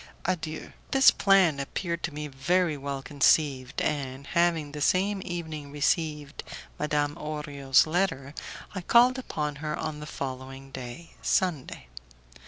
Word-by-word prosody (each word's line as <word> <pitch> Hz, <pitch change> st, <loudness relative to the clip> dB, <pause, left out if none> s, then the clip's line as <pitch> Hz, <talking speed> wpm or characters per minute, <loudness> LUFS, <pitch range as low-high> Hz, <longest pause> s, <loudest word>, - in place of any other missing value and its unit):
Adieu." 160 Hz, -3 st, -3 dB, 0.2 s
This 270 Hz, -1 st, +7 dB
plan 190 Hz, -7 st, +4 dB
appeared 170 Hz, +4 st, -3 dB
to 170 Hz, -, -2 dB
me 150 Hz, +1 st, -5 dB
very 160 Hz, +4 st, +1 dB
well 140 Hz, -1 st, -4 dB
conceived, 140 Hz, -1 st, +2 dB
and, 140 Hz, -2 st, -2 dB
having 170 Hz, -3 st, +1 dB
the 150 Hz, 0 st, -6 dB
same 195 Hz, +6 st, +2 dB
evening 160 Hz, -5 st, -5 dB
received 150 Hz, 0 st, -1 dB, 0.4 s
Madame 150 Hz, -1 st, 0 dB
Orio's 145 Hz, -3 st, +2 dB
letter, 160 Hz, -5 st, -1 dB, 0.4 s
I 185 Hz, -, -4 dB
called 245 Hz, +7 st, +5 dB
upon 150 Hz, -, -3 dB
her 150 Hz, +1 st, -3 dB
on 155 Hz, -1 st, -4 dB
the 150 Hz, -, -7 dB
following 135 Hz, -1 st, -6 dB
day, 130 Hz, +6 st, -8 dB
Sunday. 160 Hz, -, 0 dB
150 Hz, 130 wpm, -28 LUFS, 140-170 Hz, 0.4 s, This